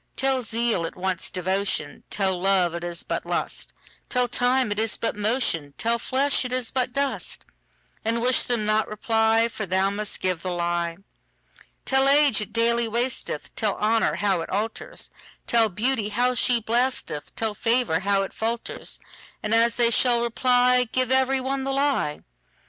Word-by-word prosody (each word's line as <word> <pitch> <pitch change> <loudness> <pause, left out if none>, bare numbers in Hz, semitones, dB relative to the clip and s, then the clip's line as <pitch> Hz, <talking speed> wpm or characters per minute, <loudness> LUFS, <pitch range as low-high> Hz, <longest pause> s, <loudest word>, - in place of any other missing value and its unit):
Tell 265 -1 +1
zeal 230 -5 0
it - - -10
wants 185 0 -2
devotion; 190 +2 -2
Tell 190 -2 0
love 185 -2 +2
it 170 0 -5
is 175 -1 -4
but - - -3
lust; - - -4 0.4
Tell 250 -1 +1
time 245 -1 +1
it 205 - 0
is 220 0 0
but 230 - -1
motion; 205 - 0
Tell 235 +1 +1
flesh 275 +4 +1
it 250 - -5
is 255 -2 -1
but 255 -1 0
dust:And 245 -4 -4
wish 255 0 +5
them 235 -4 -1
not 215 +1 +1
reply, 225 +1 +2
For 215 -3 -5
thou 190 +2 +1
must 210 0 -3
give 185 -3 -1
the 185 - -4
lie. 170 -1 -2 0.9
Tell 265 0 +3
age 285 -5 +4
it 210 - -5
daily 235 +1 +2
wasteth; 235 - -3
Tell 210 -3 0
honour 220 +1 +1
how 195 -4 0
it - - -6
alters; 220 - -3 0.3
Tell 230 -2 +3
beauty 215 +2 0
how 245 +4 +1
she 245 0 +2
blasteth; 235 - -2
Tell 220 -2 -1
favour 230 -5 +1
how 195 +1 +1
it 195 - -7
falters:And 225 -1 -5
as 230 +1 +4
they 235 -1 +3
shall 240 0 +3
reply, 250 +1 +3
Give 255 -1 0
every 265 0 +3
one 265 +1 -2
the 270 0 -2
lie. 275 - 0
230 Hz, 165 wpm, -24 LUFS, 200-250 Hz, 0.9 s, wish